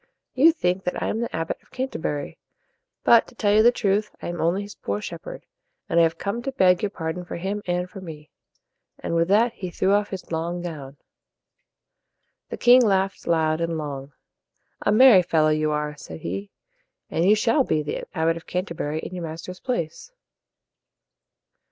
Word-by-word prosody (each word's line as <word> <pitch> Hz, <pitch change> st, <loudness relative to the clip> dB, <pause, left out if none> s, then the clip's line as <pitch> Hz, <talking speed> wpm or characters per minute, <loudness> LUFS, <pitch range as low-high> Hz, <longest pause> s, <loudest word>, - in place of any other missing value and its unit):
"You 300 Hz, +6 st, +6 dB
think 185 Hz, -, -1 dB
that 180 Hz, -, -2 dB
I -, -, -1 dB
am 220 Hz, -, -2 dB
the 235 Hz, -, -3 dB
Abbot 165 Hz, 0 st, -3 dB
of -, -, -29 dB
Can 260 Hz, +1 st, -3 dB
ter -, -, -6 dB
bur 145 Hz, -2 st, -2 dB
y. -, -, -11 dB, 0.7 s
But, 230 Hz, -1 st, +6 dB
to -, -, -17 dB
tell 205 Hz, -3 st, +2 dB
you 215 Hz, -, +6 dB
the 240 Hz, +2 st, +6 dB
truth, 210 Hz, -2 st, 0 dB
I -, -, -5 dB
am 175 Hz, -1 st, -4 dB
only 175 Hz, +5 st, +1 dB
his 205 Hz, 0 st, -9 dB
poor 100 Hz, +1 st, -4 dB
shepherd, -, -, -8 dB, 0.4 s
and 170 Hz, -, +2 dB
I -, -, +7 dB
have 165 Hz, 0 st, +1 dB
come 205 Hz, +6 st, -3 dB
to 270 Hz, -, -3 dB
beg 185 Hz, -8 st, +3 dB
your 210 Hz, -, 0 dB
pardon 165 Hz, -1 st, -4 dB
for 175 Hz, -, -7 dB
him 195 Hz, +4 st, -3 dB
and 180 Hz, 0 st, -1 dB
for 190 Hz, +1 st, -10 dB
me." 155 Hz, -4 st, -10 dB, 0.7 s
And -, -, -4 dB
with 165 Hz, 0 st, +2 dB
that, 225 Hz, +5 st, +3 dB
he 185 Hz, -, -6 dB
threw 190 Hz, +2 st, 0 dB
off 205 Hz, 0 st, +2 dB
his 190 Hz, -3 st, -7 dB
long 170 Hz, +2 st, -2 dB
gown. 145 Hz, -5 st, -7 dB, 1.5 s
The -, -, -5 dB
king 250 Hz, +1 st, +7 dB
laughed 195 Hz, -3 st, +1 dB
loud 160 Hz, -1 st, +1 dB
and 165 Hz, -1 st, -1 dB
long. 140 Hz, -2 st, -6 dB, 0.7 s
"A -, -, +1 dB
merry 220 Hz, -3 st, +8 dB
fellow 160 Hz, -3 st, +2 dB
you 155 Hz, 0 st, +1 dB
are," 150 Hz, 0 st, -2 dB
said 80 Hz, -, -10 dB
he, 100 Hz, +3 st, -4 dB, 0.6 s
"and 165 Hz, -, +1 dB
you 200 Hz, +4 st, +5 dB
shall 230 Hz, +6 st, +2 dB
be 155 Hz, -10 st, 0 dB
the 150 Hz, -, -4 dB
Abbot 165 Hz, +1 st, +2 dB
of 165 Hz, -, -12 dB
Canterbury 170 Hz, -4 st, -3 dB
in -, -, -7 dB
your 175 Hz, -2 st, -4 dB
master's 165 Hz, +3 st, -7 dB
place." 240 Hz, -, -4 dB
175 Hz, 195 wpm, -24 LUFS, 160-205 Hz, 1.5 s, merry